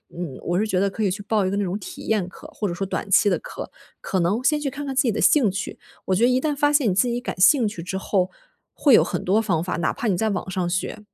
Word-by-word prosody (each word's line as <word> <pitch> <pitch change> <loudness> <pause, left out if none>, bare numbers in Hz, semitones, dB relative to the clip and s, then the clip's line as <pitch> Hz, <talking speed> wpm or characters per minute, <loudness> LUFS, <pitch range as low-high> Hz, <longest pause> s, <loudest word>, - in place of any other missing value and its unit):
嗯， 170 -6 -5
我 175 +2 -1
是 220 - 0
觉 190 -4 0
得 200 +1 +2
可 215 +3 -4
以 200 - +2
去 205 +2 -5
报 210 -1 +1
一 185 - 0
个 200 - -2
那 205 - 0
种 185 +1 -2
体 190 - -9
验 210 -5 0
课， - - -13
或 210 - -2
者 175 - -3
说 195 +2 -3
短 195 - -4
期 195 - +5
的 185 - 0
课， - - -8 0.3
可 190 - -1
能 195 +8 0
先 300 +2 +2
去 290 - -2
看 285 +2 -6
看 270 - -4
自 265 - +4
己 235 - +1
的 220 - -3
兴 260 -9 +4
趣。 195 +1 -5 0.3
我 190 - +1
觉 220 - +1
得 245 - +5
一 255 0 +2
旦 300 0 -1
发 290 +1 +2
现 285 -6 +3
你 - - +1
自 225 +6 +3
己 240 0 -1
感 250 - -6
兴 235 +5 +5
趣 205 -5 -6
之 190 +1 -4
后 190 -1 0 0.4
会 280 - +3
有 - - +7
很 - - -3
多 200 +4 +3
方 175 -7 0
法， 180 - -3
哪 165 -2 0
怕 245 - -3
你 195 - +2
在 220 +2 0
网 190 -2 -3
上 180 -2 -2
学， 180 +3 -3
205 Hz, 335 characters per minute, -23 LUFS, 185-240 Hz, 0.4 s, 有